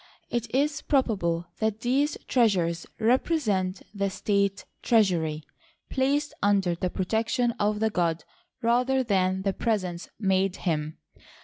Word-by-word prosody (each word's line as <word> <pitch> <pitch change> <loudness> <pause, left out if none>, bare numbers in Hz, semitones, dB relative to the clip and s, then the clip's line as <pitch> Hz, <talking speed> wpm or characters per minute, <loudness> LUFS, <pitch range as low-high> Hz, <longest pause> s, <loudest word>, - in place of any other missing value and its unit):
It 240 -1 -2
is 285 +3 +1
probable 190 - +1
that 220 0 -1
these 275 +5 +1
treasures 180 -9 +2
represent 220 - +1
the 200 -1 -1
state 200 0 0 0.2
treasury, 170 -9 +2 0.5
placed 280 +2 +1
under 195 -3 +2
the 180 +2 -2
protection 225 +6 0
of 210 0 +1
the 220 0 +1
god 170 -4 0 0.4
rather 250 +3 +2
than 190 -4 +1
the 195 -1 0
presents 185 -7 -2
made 190 -2 +1
him. 155 -2 -1
205 Hz, 120 wpm, -27 LUFS, 185-240 Hz, 0.5 s, treasures